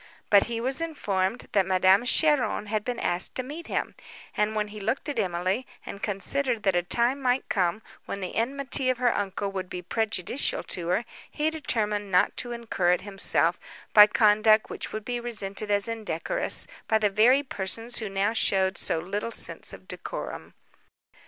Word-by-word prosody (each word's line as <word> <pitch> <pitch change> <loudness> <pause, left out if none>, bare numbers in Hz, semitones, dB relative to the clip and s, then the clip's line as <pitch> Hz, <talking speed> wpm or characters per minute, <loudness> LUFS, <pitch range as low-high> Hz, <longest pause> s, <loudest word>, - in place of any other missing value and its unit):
But 200 -1 +6
he 235 -1 -4
was 260 +6 -2
informed, 210 - -2
that 195 - +3
Madame 190 +4 +4
Cheron 295 -4 +2
had 210 0 -2
been 245 +1 -3
asked 175 +1 +1
to 255 - -1
meet 305 +6 -8
him; - - -2 0.4
and, 210 +1 0
when 210 -1 -1
he 210 +1 -9
looked 235 +9 -2
at 285 - -2
Emily, 185 +5 -1 0.2
and 200 - -8
considered 230 +4 -1
that 195 -2 +2
a 175 - +3
time 240 +9 +1
might 255 0 0
come 185 +2 0 0.2
when 200 - -4
the 185 -2 -5
enmity 265 +2 0
of 255 - +1
her 245 -1 +2
uncle 200 0 -2
would 190 -2 -5
be 180 - -6
prejudicial 220 +5 0
to 170 -2 -3
her, 190 +7 0 0.2
he 310 +1 -1
determined 210 -9 -1
not 180 - +3
to 240 - -3
incur 220 -7 0
it 180 - -1
himself, 200 -1 0 0.3
by 210 -1 +10
conduct 215 0 +4
which - - -5
would 215 -1 -6
be 245 -1 -2
resented 215 -3 -4
as 205 0 +1
indecorous, 225 - +1 0.2
by 220 - +3
the 210 -2 +1
very 245 +7 +4
persons 225 0 -2
who 215 -3 -4
now 195 +3 0
showed 190 -3 +2
so - - -1
little 200 +7 -3
sense - - -2
of - - -12
decorum. - - -6
215 Hz, 180 wpm, -26 LUFS, 195-245 Hz, 0.4 s, by